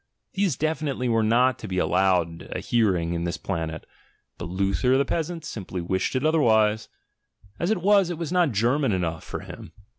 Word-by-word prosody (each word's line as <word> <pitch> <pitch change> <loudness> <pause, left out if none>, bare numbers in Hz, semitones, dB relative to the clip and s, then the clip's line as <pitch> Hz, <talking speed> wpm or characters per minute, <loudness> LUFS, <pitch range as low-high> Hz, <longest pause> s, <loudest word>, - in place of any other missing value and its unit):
These 190 -7 0
definitely 155 -4 -1
were 115 -1 +2
not 120 +4 +3
to 110 - -7
be 95 -1 -3
allowed 90 -3 +1
a - - -4
hearinir 95 -8 +1
in 85 0 -2
this 85 +1 -2
planet 80 -4 -4 0.3
— - - -44
but - - -5
Luther 100 +8 +1
the 140 - +2
peasant 165 +2 -3
simply 95 - -6
it 130 +9 0
otherwise; 110 -9 +3 0.7
as 170 - 0
it 215 -6 0
was, 200 -2 +4
it 175 - -4
was 165 -1 -4
not 175 -5 +3
German 120 +4 +1
enough 85 -3 -2
for - - -6
him. 80 - -11
115 Hz, 180 wpm, -25 LUFS, 95-155 Hz, 0.7 s, was